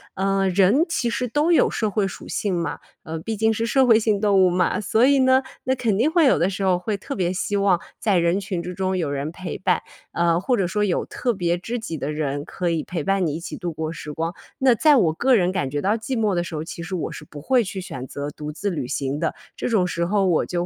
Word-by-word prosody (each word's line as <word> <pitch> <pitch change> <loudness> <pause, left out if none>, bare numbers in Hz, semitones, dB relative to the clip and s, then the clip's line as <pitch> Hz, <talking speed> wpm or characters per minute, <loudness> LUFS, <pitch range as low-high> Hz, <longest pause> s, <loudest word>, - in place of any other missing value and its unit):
呃， 195 0 +1
人 200 - +4
其 250 -8 0
实 250 +1 -2
都 300 +8 +2
有 - - +4
社 215 - -1
会 205 0 0
属 195 - -7
性 200 -3 -2
嘛， 170 -3 -2 0.2
呃， 160 +1 -5
毕 215 +6 -4
竟 220 +1 +2
是 225 +2 -1
社 260 +2 +3
会 225 - +7
性 215 -2 +1
动 205 -2 +3
物 180 - +4
嘛。 180 +4 +1
所 220 +4 +3
以 280 +1 +4
呢， 260 0 +5 0.2
那 260 - +1
肯 230 -6 0
定 265 +9 +2
会 335 -2 +4
有 265 - +5
的 175 +3 +2
时 195 +1 -4
候 185 -1 +3
会 200 +4 -3
特 275 +8 -6
别 180 -1 0
希 185 +2 -2
望 195 -3 +3 0.2
在 205 -4 +1
人 170 +3 +2
群 190 -3 -3
之 180 +1 -6
中 190 0 -1
有 160 -5 -1
人 145 +2 -3
陪 180 0 -6
伴， - - +1 0.3
呃， 170 -1 +2
或 245 +5 +1
者 190 -4 +1
说 210 +3 0
有 190 -4 0
特 245 - -2
别 175 -3 0
知 230 +7 -4
己 195 -8 -5
的 140 +1 -3
人 145 -2 -2
可 180 +1 -3
以 165 -2 -1
陪 170 -5 -4
伴 195 -1 +2
你 150 -3 -1
一 - - -4
起 170 - -7
度 175 -4 -4
过 160 +1 -4
时 150 -2 -7
光。 165 +3 -3 0.2
那 265 -3 +4
在 300 +4 +5
我 165 -9 +3
个 255 +10 +2
人 185 -5 +3
感 180 -8 -1
觉 145 -1 -2
到 205 +3 +2
寂 230 +2 -3
寞 210 -4 +1
的 175 - 0
时 170 - -8
候， 155 +1 -4
其 170 - -7
实 165 - -7
我 175 - -2
是 - - -9
不 150 -1 -11
会 250 - +3
去 190 - -5
选 130 -7 -7
择 145 +2 -5
独 150 0 -7
自 200 +7 -3
旅 145 -7 -3
行 140 +1 -2
的， 165 -1 -1 0.2
这 - - -3
种 210 -6 +2
时 170 -1 -2
候 195 +2 +1
我 175 -4 +2
就 175 0 -2
190 Hz, 295 characters per minute, -23 LUFS, 170-220 Hz, 0.3 s, 会